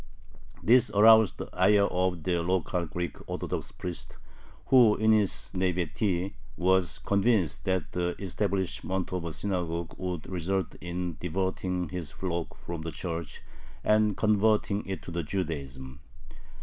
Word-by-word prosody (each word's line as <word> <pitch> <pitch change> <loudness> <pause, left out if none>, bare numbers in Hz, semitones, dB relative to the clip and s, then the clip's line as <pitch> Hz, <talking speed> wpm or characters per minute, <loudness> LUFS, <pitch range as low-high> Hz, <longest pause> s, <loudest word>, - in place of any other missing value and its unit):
This 120 0 +5
aroused 110 0 +7
the - - -5
ire 100 -1 +4
of 90 -3 -1
the 85 0 +1
local 90 0 0
Greek 90 -2 -4
Orthodox - - -4
priest, 90 -2 -7 0.5
who 120 -5 +7
in 110 +1 +3
his 105 -3 +2
naïveté 90 +1 0 0.2
was 95 0 +2
convinced 100 - +1
that 95 -1 -1
the 90 0 -1
establishment 95 -1 -2
of 90 -2 -2
a 85 - -3
synagogue 85 -1 -3
would 90 -3 -4
result 95 0 -2
in 85 -1 -4
diverting 90 0 -2
his 90 -4 -5
flock 85 -1 -4
from 85 -2 -6
the 85 +1 -4
Church 85 -3 -5 0.4
and 105 -1 +3
converting 105 -1 +2
it 95 -5 -4
to - - -8
Judaism. 70 -7 -4
90 Hz, 130 wpm, -28 LUFS, 85-100 Hz, 0.5 s, aroused